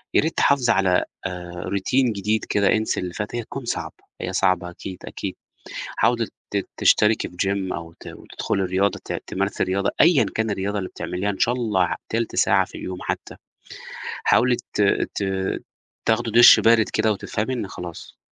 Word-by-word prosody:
يا - - +6
ريت 160 +2 -2
تحافظي 130 -5 +3
على 95 -2 +3 0.2
آآ، 90 -1 -6
routine 125 +5 +2
جديد 105 +2 -1
كده، 100 -2 +2
انسي 110 0 0
اللي 90 -1 -4
فات، 105 +4 -4
هي 120 - -2
تكون 135 +3 -7
صعبة، - - -3 0.3
هي 90 - -3
صعبة 95 -2 +1
أكيد، 90 +1 -8
أكيد، - - -5 0.6
حاولي - - +2 0.2
ت - - -1
تشتركي 105 +1 +3
في 90 - -16
gym 95 -1 -1
أو 85 -1 -6
ت - - -12
وتدخلي 95 - -3
رياضة، 95 +2 0
ت - - -5
تمارسي 100 +2 -1
الرياضة 95 +1 0
أيًا 155 - +6
كان 110 0 0
الرياضة 100 +1 -2
اللي 95 -2 -3
بتعمليها، 95 +3 -3
إن 95 - -5
شاء 120 - +2
الله 105 -8 0
تلت 115 0 -2
ساعة 95 0 +4
في - - -18
اليوم 90 -1 -5
حتّى، - - -4 0.9
حاولي 125 0 +4 0.2
ت 105 - +2 0.3
ت 100 - 0 0.8
تاخدي - - +2
دُش 120 +2 +9
بارد 115 -2 +4
كده 110 - +1
وتفهمي 105 +4 -3
إن 110 -6 -4
خلاص 85 -2 -9
100 Hz, 175 wpm, -23 LUFS, 95-115 Hz, 0.9 s, دُش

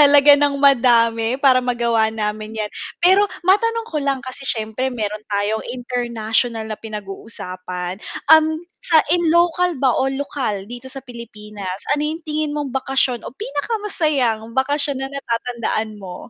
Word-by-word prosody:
talaga 290 0 +8
ng 290 -1 +2
madami 230 -4 +4 0.2
para 260 -2 +6
magawa 235 -2 +2 0.2
namin 215 +1 -3
yan. 210 - -3 0.3
Pero, 380 +3 +6 0.3
matanong 460 +3 +3
ko 305 - 0
lang 275 -1 0
kasi 255 +2 -7
siyempre 220 +2 -3
meron 210 0 -3
tayong 205 +2 0
international 235 -2 -1
na 215 - -5
pinag-uusapan, 185 -4 -6 0.4
um, 315 -1 +8 0.4
sa 330 - +5 0.2
in 350 - +1
local 350 +1 +3
ba 265 - +5
o - - +2 0.2
lokal 270 -7 -2 0.2
dito 245 +2 -8
sa 270 - -7
Pilipinas, 210 -5 -7 0.2
ano 295 - -1
yung 320 +2 -5
tingin 305 -1 -2
mong 290 -2 -3
bakasyon 265 -2 0
o - - -7
pinakamasayang 335 - -1 0.2
bakasyon 285 0 0
na 270 - -3
natatandaan 235 -4 -2
mo? 180 -2 -7
245 Hz, 145 wpm, -20 LUFS, 220-290 Hz, 0.4 s, talaga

